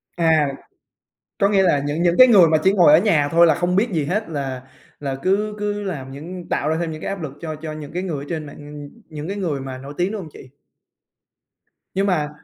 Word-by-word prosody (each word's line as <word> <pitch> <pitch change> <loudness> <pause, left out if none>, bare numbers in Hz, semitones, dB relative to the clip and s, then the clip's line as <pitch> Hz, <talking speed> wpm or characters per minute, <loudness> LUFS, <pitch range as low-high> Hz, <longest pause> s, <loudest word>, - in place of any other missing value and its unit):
À, 160 -3 +3 0.9
có 200 - +4
nghĩa 200 -2 +3
là 170 -6 +3
những 150 +4 -1
những 175 0 +2
cái 255 0 +9
người 190 -8 +7
mà 155 - +3
chỉ 190 - +4
ngồi 175 -7 +6
ở 155 - +8
nhà 165 -8 +2
thôi 170 +1 +6
là 160 - +4
không 180 +1 0
biết 225 +5 +2
gì 155 -3 0
hết 190 +8 -2
là 135 -5 -4 0.4
là 135 -2 -3
cứ 210 +3 0
cứ 205 0 -2
làm 145 -10 -5
những 170 +6 -8
tạo 145 - -1
ra 160 - +1
thêm 170 - -2
những 155 - -8
cái - - -4
áp 195 -3 -4
lực 145 - -5
cho 155 -2 -5
cho 155 0 -7
những 150 -2 -8
cái 180 +2 -3
người 150 -7 -4
ở - - -14
trên 160 -3 -4
mạng, 145 - -11 0.3
nh - - -12 0.2
những 155 +1 -7
cái 200 - -4
người 160 -8 -2
mà 130 -1 -6
nổi 140 +2 -9
tiếng, 180 +3 0
đúng 215 - -4
hông 160 -5 -9
chị? 130 - -13 1.4
Nhưng 195 +1 0
mà 155 -6 0
165 Hz, 250 wpm, -21 LUFS, 150-190 Hz, 1.4 s, cái